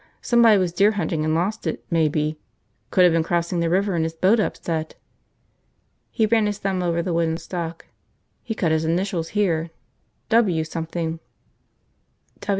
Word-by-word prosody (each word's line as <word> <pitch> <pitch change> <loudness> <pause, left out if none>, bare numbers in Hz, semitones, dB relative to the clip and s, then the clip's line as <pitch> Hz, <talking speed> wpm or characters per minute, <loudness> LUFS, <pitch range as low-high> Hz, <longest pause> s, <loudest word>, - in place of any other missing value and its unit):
Somebody 235 -3 +5
was 180 -3 0
deer 200 +4 +4
hunting 165 -6 -1
and 155 0 +1
lost 195 +7 -1
it, - - -4
maybe. 155 -1 +1 0.5
Could 185 - +4
have 175 -2 +5
been 165 - +3
crossing 170 +1 -1
the 170 -1 +1
river 195 +3 +1
and 165 -2 0
his 160 0 -3
boat 190 +7 +3
upset." 160 -6 -2 1.1
He 220 - +1
ran 220 -1 +2
his 205 -1 -2
thumb 195 -2 -2
over 170 -1 0
the 175 -1 -2
wooden 165 -1 0
stock. 170 -2 -6 0.6
"He 225 - -5
cut 170 -6 0
his 160 0 +1
initials 170 0 -1
here. 170 -5 +1 0.6
W 200 -8 +3
something." 165 0 -4
170 Hz, 155 wpm, -23 LUFS, 160-195 Hz, 1.1 s, Somebody